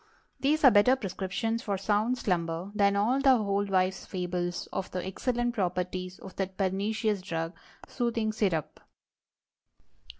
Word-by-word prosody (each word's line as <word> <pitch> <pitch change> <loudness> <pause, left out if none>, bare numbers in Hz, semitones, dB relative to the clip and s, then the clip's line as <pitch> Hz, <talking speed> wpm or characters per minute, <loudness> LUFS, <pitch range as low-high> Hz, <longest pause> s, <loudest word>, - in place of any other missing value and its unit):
These 300 +3 +1
are 265 - +9
better 215 +5 +6
prescriptions 225 +1 -2
for 200 -2 -2
sound 215 +5 +1
slumber 175 -3 -1
than 200 -1 +3
all 235 +7 +2
the 270 -1 +6
old 200 -2 0
wives' 185 0 +1
fables 180 -1 -3
of 190 - -3
the 180 0 -4
excellent 240 +5 -1
properties 185 -2 -2
of 190 - -11
that 190 -1 -3
pernicious 205 +2 0
drug—Soothing 215 +7 -3
Syrup. 190 -8 -1
200 Hz, 130 wpm, -29 LUFS, 185-225 Hz, -, are